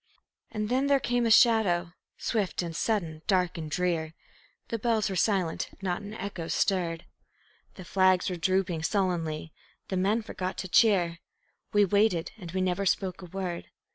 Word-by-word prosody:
And 215 -2 -3
then 260 +4 +1
there 280 -1 +4
came 245 -2 0
a - - +1
shadow, 205 -7 +4 0.2
swift 205 -5 -1
and 165 -1 -5
sudden, 165 -7 -1
dark 180 -3 +2
and 160 -3 -5
drear; 165 -1 -1 0.5
The 230 - -2
bells 220 -3 +1
were - - -3
silent, 185 -3 0
not 185 0 -2
an 205 +1 -8
echo 195 -6 -5
stirred. 170 -4 0 0.7
The 185 - -10
flags 185 -1 +3
were 180 - -1
drooping 180 -1 0
sullenly, 165 -4 -1 0.4
the 190 - -1
men 205 +5 +1
forgot 185 -4 -4
to 190 - -4
cheer; 180 -5 +3 0.5
We 205 -1 +4
waited, 200 -3 +2
and 175 -4 -8
we 185 +1 -1
never 185 +1 0
spoke 185 0 0
a - - -8
word. 180 -1 -5
185 Hz, 165 wpm, -28 LUFS, 175-210 Hz, 0.7 s, there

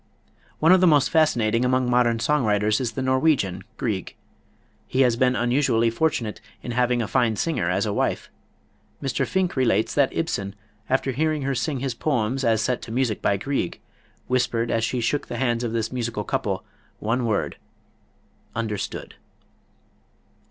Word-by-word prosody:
One 160 +3 +4
of 185 0 +6
the 185 - +6
most 145 -4 +4
fascinating 120 -8 +2
among 130 0 +2
modern 120 -2 +2
song 150 +3 +1
writers 105 +1 +2
is 120 -3 -2
the 130 - -3
Norwegian, 130 - +1
Grieg. 100 -6 -3 0.7
He 130 - +1
has 125 -3 +4
been 125 +1 +2
unusually 120 -2 +2
fortunate 115 -5 -1 0.2
in 120 - -4
having 125 0 +1
a - - -4
fine 115 0 +1
singer 95 - -1
as 95 +3 +1
a 105 - -1
wife. - - -1 0.7
Mr. 135 -3 -1
Finck 185 -1 0
relates 115 -5 +2
that 140 -2 +3
Ibsen, 100 -12 -2 0.3
after 130 +1 +1
hearing 155 +2 0
her 140 +1 0
sing 130 +1 -2
his 135 -2 -1
poems 130 -1 -1
as 110 -3 +2
set 125 +2 -1
to 110 - -8
music 120 -3 0
by 100 - +2
Grieg, 135 -5 -2 0.5
whispered 120 -2 0
as 115 0 +1
he 125 - -2
shook 140 +5 -1
the - - -5
hands 120 -2 0
of 120 - -2
this 115 -1 -2
musical 120 -4 -3
couple, - - -2 0.3
the - - -12
one 120 +2 +1
word, 105 -3 -1 1.0
"Understood." 110 -3 -4
120 Hz, 165 wpm, -24 LUFS, 110-135 Hz, 1.0 s, of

